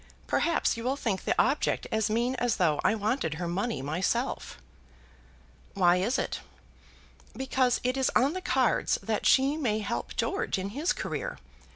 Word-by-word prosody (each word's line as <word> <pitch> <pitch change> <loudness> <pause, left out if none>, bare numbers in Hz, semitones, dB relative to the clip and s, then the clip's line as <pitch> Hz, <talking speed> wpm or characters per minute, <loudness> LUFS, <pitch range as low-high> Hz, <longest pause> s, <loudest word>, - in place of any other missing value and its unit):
Perhaps 335 -7 +1
you'll 250 +4 -1
think 220 -8 -2
the - - +1
object 275 +5 +1
as 220 -1 +1
mean 235 +4 +1
as 245 -2 +1
though 160 -6 +2
I 215 - +3
wanted 210 - -1
her 175 +2 -3
money 175 - -2
myself." 160 +6 -2 1.2
"Why 180 -2 +4
is 220 +9 +1
it?" - - -2 1.0
"Because 260 -1 +1
it 255 +1 +1
is 265 -1 +1
on 275 +4 +4
the 370 - -4
cards 255 -6 +2
that 220 -2 0
she 275 +3 +4
may 235 -9 0
help 215 - -4
George 430 - -1
in 190 +1 -3
his 290 - -1
career. - - -3
230 Hz, 160 wpm, -28 LUFS, 195-265 Hz, 1.2 s, Why